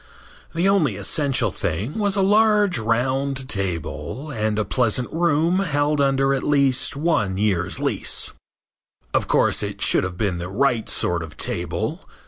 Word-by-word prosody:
The 170 Hz, +3 st, +1 dB
only 170 Hz, -, +2 dB
essential 125 Hz, +2 st, 0 dB
thing 100 Hz, -, -3 dB
was 200 Hz, -2 st, +1 dB
a 195 Hz, -, +2 dB
large 210 Hz, -, +3 dB
round 130 Hz, +4 st, -1 dB
table 95 Hz, -, -3 dB
and 110 Hz, -3 st, -1 dB
a 110 Hz, -, 0 dB
pleasant 120 Hz, +3 st, +1 dB
room 170 Hz, +2 st, +2 dB
held 150 Hz, -5 st, 0 dB
under 135 Hz, 0 st, +2 dB
at 135 Hz, -, -1 dB
least 140 Hz, -3 st, +2 dB
one 140 Hz, -, 0 dB
year's 95 Hz, -3 st, 0 dB
lease. -, -, 0 dB, 0.8 s
Of -, -, +1 dB
course, -, -, +2 dB
it -, -, -5 dB
should -, -, +3 dB
have 95 Hz, -1 st, -5 dB
been 95 Hz, -4 st, -1 dB
the 90 Hz, +1 st, -5 dB
right 120 Hz, +1 st, 0 dB
sort 85 Hz, -1 st, -1 dB
of 80 Hz, -1 st, -9 dB
table. -, -, -3 dB
130 Hz, 150 wpm, -22 LUFS, 100-150 Hz, 0.8 s, large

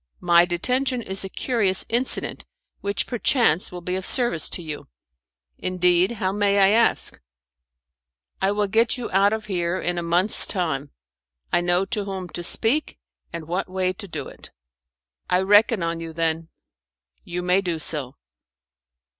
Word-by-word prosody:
My 175 Hz, 0 st, +4 dB
detention 250 Hz, +8 st, -1 dB
is 190 Hz, -1 st, -3 dB
a 195 Hz, -, -6 dB
curious 205 Hz, -5 st, +2 dB
incident, 245 Hz, +3 st, 0 dB, 0.4 s
which, 200 Hz, 0 st, -2 dB
perchance, 235 Hz, -, +1 dB
will 180 Hz, -1 st, -8 dB
be 180 Hz, +1 st, -4 dB
of 190 Hz, -, -3 dB
service 240 Hz, -, +2 dB
to 175 Hz, -, -2 dB
you." 155 Hz, -2 st, -7 dB, 0.7 s
"Indeed. 180 Hz, +2 st, +1 dB
How, 190 Hz, -4 st, -2 dB
may 200 Hz, 0 st, +1 dB
I 195 Hz, -1 st, +5 dB
ask?" 230 Hz, +3 st, +2 dB, 1.2 s
"I 195 Hz, +1 st, +2 dB
will 205 Hz, 0 st, 0 dB
get 225 Hz, +4 st, +1 dB
you 245 Hz, -, -6 dB
out 195 Hz, +2 st, +3 dB
of 220 Hz, 0 st, -3 dB
here 180 Hz, -2 st, -2 dB
in 175 Hz, 0 st, -2 dB
a -, -, -3 dB
month's 175 Hz, +5 st, +3 dB
time. 155 Hz, -7 st, -2 dB, 0.6 s
I -, -, +3 dB
know 175 Hz, +2 st, +1 dB
to 210 Hz, -1 st, -3 dB
whom 190 Hz, -2 st, -6 dB
to 175 Hz, -, -6 dB
speak 230 Hz, -, +2 dB, 0.3 s
and 165 Hz, -2 st, -7 dB
what 180 Hz, +3 st, -3 dB
way 185 Hz, 0 st, -1 dB
to 200 Hz, +2 st, -9 dB
do 170 Hz, -, -6 dB
it." -, -, -13 dB, 0.8 s
"I 180 Hz, +1 st, +2 dB
reckon 205 Hz, +1 st, +4 dB
on 165 Hz, 0 st, -2 dB
you, 165 Hz, -1 st, -7 dB
then." 165 Hz, 0 st, -2 dB, 0.7 s
"You 180 Hz, +1 st, -5 dB
may 180 Hz, +2 st, +2 dB
do 175 Hz, -4 st, -2 dB
so." 145 Hz, -4 st, 0 dB
185 Hz, 160 wpm, -23 LUFS, 175-205 Hz, 1.2 s, I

